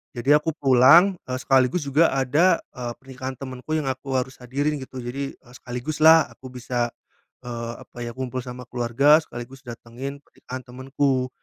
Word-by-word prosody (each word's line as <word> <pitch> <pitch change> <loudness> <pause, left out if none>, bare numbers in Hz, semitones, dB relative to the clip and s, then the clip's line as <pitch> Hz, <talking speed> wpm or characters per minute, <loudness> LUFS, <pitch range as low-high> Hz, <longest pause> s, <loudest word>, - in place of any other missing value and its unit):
jadi 140 +5 +4
aku 160 - 0
pulang, 140 +8 +6
eee, 130 0 -2
sekaligus 135 +4 +2
juga 155 +5 +4
ada, 145 +7 +3 0.2
eee, 120 -1 -4
pernikahan 130 0 -7
temenku 130 +2 -8
yang 140 - -4
aku 130 0 -1
harus 130 0 -5
hadirin 145 +5 -1
gitu 130 0 -8
jadi, 135 +3 -4
eee, 120 -1 -20
sekaligus 125 +6 -4
lah 160 0 +8
aku 130 -1 -11
bisa, 120 -1 -2 0.5
eee, 115 -1 -5
apa - - -22
ya, 120 - -5
kumpul 130 -1 -4
sama 125 0 -9
keluarga 125 +5 +4
sekaligus 125 +2 -10
datengin 125 +3 -8
pernikahan 130 0 -9
temenku. 130 +1 -1
130 Hz, 165 wpm, -24 LUFS, 125-140 Hz, 0.5 s, lah